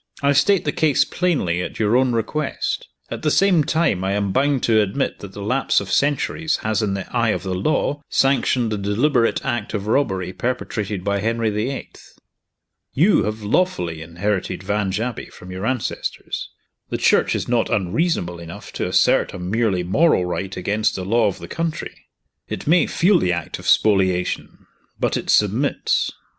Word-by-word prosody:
I 140 - +4
state 170 +7 +3
the 145 - +1
case 150 -2 +2
plainly, 130 - 0
at - - -5
your 110 +1 +2
own 130 -1 +3
request. 130 +7 -2 0.2
At - - -5
the 155 - +1
same 180 -1 +4
time, 155 - +1
I 95 +1 0
am 100 -1 0
bound 135 +4 +1
to 110 -2 +4
admit 105 +7 -1
that 100 -1 -10
the 100 - -7
lapse 130 +6 +2
of 95 -2 -6
centuries 150 - +1
has, 110 +1 0
in 100 -2 0
the 100 - -4
eye 115 -2 +2
of 90 -4 -1
the 95 -1 -3
law, 145 +8 0
sanctioned 130 -3 +2
the 105 - -2
deliberate 115 +5 +1
act 115 -2 -2
of 100 -1 -3
robbery 95 -7 0
perpetrated 105 -6 -3
by 100 0 0
Henry 115 +1 0
the 105 +4 -1
Eighth. 135 - -9 0.8
You 180 +9 +4
have 105 +1 -4
lawfully 95 - 0
inherited 90 +4 -3
Vange 100 0 -1
Abbey 120 +2 -4
from 90 0 -12
your 95 +4 -4
ancestors. 130 -3 -3 0.4
The - - -2
Church - - +3
is - - -3
not 120 -2 +1
unreasonable 95 - 0
enough 85 0 -10
to - - -2
assert - - +2
a - - -5
merely 95 0 0
moral 95 - +3
right 95 +2 -4
against 105 +3 0
the 95 - -4
law 115 +2 +3
of 100 - -2
the - - -9
country. 165 -1 -5 0.4
It - - -5
may 165 +1 +4
feel 180 +1 +3
the 90 - +1
act 85 -2 -4
of - - -9
spoliation 95 -4 +1 0.3
but - - 0
it - - -4
submits." - - +2
110 Hz, 175 wpm, -21 LUFS, 95-140 Hz, 0.8 s, I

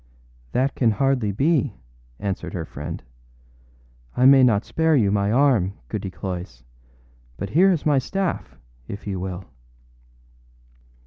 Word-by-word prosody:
â 125 - +3
âThat 140 - -10
can 120 - +2
hardly 125 -1 +1
be,â 145 - +1 0.5
answered 95 -2 -4
her 85 -3 -3
friend. 75 0 -7 1.1
âI 125 - +6
may 135 0 +8
not 115 -4 +3
spare 160 -1 +2
you 105 -7 +3
my 100 0 +1
arm, 120 -7 +3 0.2
Goody 95 - -3
Cloyse; 90 -9 -6 0.7
but 100 +1 -5
here 185 +6 +5
is 175 -6 0
my 145 -3 +4
staff, 195 +7 -3 0.3
if 100 - -7
you 95 -3 -3
will. 95 0 -5
105 Hz, 135 wpm, -23 LUFS, 95-140 Hz, 1.1 s, may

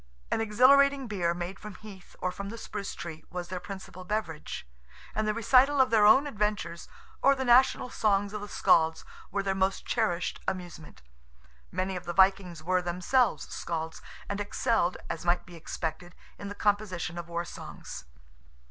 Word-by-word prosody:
An - - +1
exhilarating 270 +5 +5
beer, 180 -6 -1
made 175 +2 -5
from 210 -2 -9
heath, 195 -3 -13
or 180 - -1
from 200 +2 -6
the 230 - -7
spruce 205 -3 -5
tree, 160 -2 -7
was 180 -1 -5
their 185 0 -3
principal 190 -1 -9
beverage, 180 - -4 0.5
and 215 0 -1
the 215 - +2
recital 260 +5 +4
of 260 -2 +4
their 215 -2 +6
own 265 +7 +7
adventures, 210 -8 -2 0.3
or 275 +1 +5
the 265 -1 -2
national 250 +1 +4
songs 205 -1 +1
of 210 - -4
the 205 - -6
Scalds, 160 -5 +3 0.2
were 200 0 -1
their 195 -1 0
most 190 0 0
cherished 180 -7 0
amusement. 175 - -6 0.7
Many 190 +1 -2
of 180 0 -6
the 175 - -3
Vikings 190 -3 +3
were 185 +2 +2
themselves 180 +8 +1
Scalds, 160 -1 -4 0.3
and 200 0 -3
excelled, 205 -2 +1
as 165 - -4
might 175 0 +1
be 175 - -12
expected, 165 +2 -5 0.2
in 200 - -6
the 205 - -6
composition 195 -5 -1
of 170 0 -8
war 170 0 -2
songs. 65 - -9
195 Hz, 170 wpm, -29 LUFS, 175-215 Hz, 0.7 s, own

